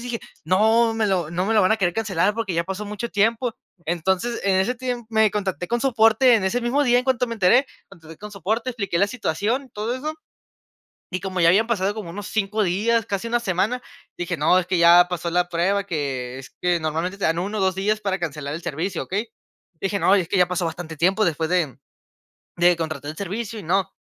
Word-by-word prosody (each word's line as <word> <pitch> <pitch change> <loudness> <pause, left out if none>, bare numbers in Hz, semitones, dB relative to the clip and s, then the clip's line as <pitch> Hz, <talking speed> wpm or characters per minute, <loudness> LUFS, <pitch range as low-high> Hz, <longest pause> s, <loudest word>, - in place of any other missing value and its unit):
y - - -9
dije: 240 -2 -4 0.2
"No 220 +6 +3
me 225 -1 +1
lo 175 -5 0
no 180 +2 -1
me 225 - +1
lo 210 - +5
van 185 - +4
a - - +2
querer 175 -3 +1
cancelar 205 -3 +1
porque 220 -5 -3
ya 170 - +1
pasó 190 +3 -5
mucho 210 +3 -5
tiempo". 225 +3 +1 0.3
Entonces, 190 +7 -1
en 195 -1 +3
ese 195 +7 +1
tiempo, 245 -2 -4
me 220 -2 +3
contacté 195 -3 -3
con 240 0 0
soporte 235 -1 +4
en 210 -4 +1
ese 230 +6 0
mismo 255 +5 +1
día, 245 -2 +4
en 250 - -1
cuanto 260 -2 +1
me 230 - -3
enteré 230 +6 +4 0.2
contacté 165 -4 -14
con 210 0 -9
soporte, 220 +6 -2
expliqué 200 -8 -2
la 200 - +4
situación, 235 - -2
todo 215 +3 -3
eso. 305 +5 -4 1.0
Y 185 - -1
como 185 -2 -2
ya 170 - +6
habían 215 +6 +4
pasado 205 -3 0
como 210 -5 -7
unos 205 +2 -7
5 215 0 0
días, 220 +5 +1
casi 200 +2 -3
una 240 +1 +1
semana, 220 +4 0 0.4
dije: 175 0 -2
"No, 160 +5 +4
es 180 - -4
que 185 - 0
ya 170 +1 +7
pasó 175 -1 -3
la 180 0 +1
prueba", 190 +4 0
que 135 -7 -3
es 135 - -12
que 175 -1 +2
normalmente 165 +5 -2
te 200 - -7
dan 165 +1 +1
1 205 +4 -3
o - - 0
2 190 -1 +1
días 210 +3 0
para 195 -2 -1
cancelar 150 -4 -4
el 165 - -5
servicio, 170 +5 -3
¿okey? 210 +4 -3 0.5
Dije: 195 +1 -1
"No, 195 - +4
y - - +2
es 170 - -7
que 195 - +1
ya 180 - +4
pasó 180 -1 -1
bastante 165 -1 -5
tiempo 190 +7 +2
después 160 -1 -1
de 170 -9 0 0.8
de 175 +1 +5
contratar 155 -3 -4
el 155 - -15
servicio 210 +3 -4
y - - -9
no". 190 +3 0
195 Hz, 230 wpm, -23 LUFS, 175-225 Hz, 1.0 s, ya